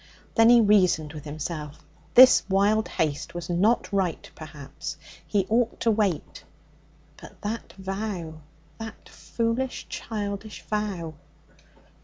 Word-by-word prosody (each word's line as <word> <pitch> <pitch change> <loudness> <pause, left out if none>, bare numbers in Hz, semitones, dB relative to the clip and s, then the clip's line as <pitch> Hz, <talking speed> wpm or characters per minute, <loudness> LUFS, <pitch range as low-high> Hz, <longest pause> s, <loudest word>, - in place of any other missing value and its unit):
Then 225 0 +6
he 240 0 +8
reasoned 185 -8 +3
with 150 -1 -9
himself. 150 0 -6 0.3
This 255 +1 +9
wild 205 +3 +3
haste 155 +2 -2
was 175 0 -4
not 205 +6 +2
right, 185 -5 -1
perhaps. 150 0 -8 0.3
He 200 -3 +1
ought 230 +2 +1
to 230 - +3
wait. 200 -8 -1 0.7
But - - -14
that 220 +3 -5
vow! 190 -4 -5 0.4
That 225 -1 -9
foolish, 235 +3 -3
childish 205 -1 -5
vow! 200 -7 -3
195 Hz, 115 wpm, -26 LUFS, 160-220 Hz, 0.7 s, This